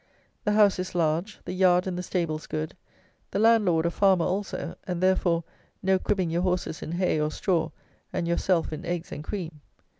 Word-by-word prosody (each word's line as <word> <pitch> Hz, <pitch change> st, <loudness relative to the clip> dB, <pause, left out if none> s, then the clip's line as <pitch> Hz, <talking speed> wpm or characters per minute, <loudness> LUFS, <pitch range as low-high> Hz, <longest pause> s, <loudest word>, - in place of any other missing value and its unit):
The 210 Hz, -, +2 dB
house 205 Hz, -3 st, +5 dB
is 185 Hz, 0 st, -4 dB
large, 170 Hz, +4 st, 0 dB
the -, -, -4 dB
yard 180 Hz, -1 st, +4 dB
and 185 Hz, -2 st, -2 dB
the 180 Hz, -, -3 dB
stables 165 Hz, -4 st, -2 dB
good, 155 Hz, 0 st, -3 dB, 0.5 s
the -, -, -3 dB
landlord 205 Hz, -7 st, +4 dB
a 170 Hz, -, +1 dB
farmer 190 Hz, -2 st, +3 dB
also, 200 Hz, +2 st, -2 dB
and, 180 Hz, -2 st, -2 dB
therefore, 180 Hz, -2 st, +2 dB, 0.4 s
no 190 Hz, 0 st, +3 dB
cribbing 185 Hz, -3 st, 0 dB
your 170 Hz, +1 st, +1 dB
horses 180 Hz, -4 st, -1 dB
in 160 Hz, -, -5 dB
hay 175 Hz, -3 st, +1 dB
or 150 Hz, -, +1 dB
straw 165 Hz, 0 st, 0 dB, 0.4 s
and 170 Hz, -, -2 dB
yourself 170 Hz, -1 st, +1 dB
in 155 Hz, +3 st, -6 dB
eggs 175 Hz, -1 st, -3 dB
and 150 Hz, -, -6 dB
cream. 165 Hz, -5 st, -5 dB
180 Hz, 185 wpm, -27 LUFS, 165-190 Hz, 0.5 s, house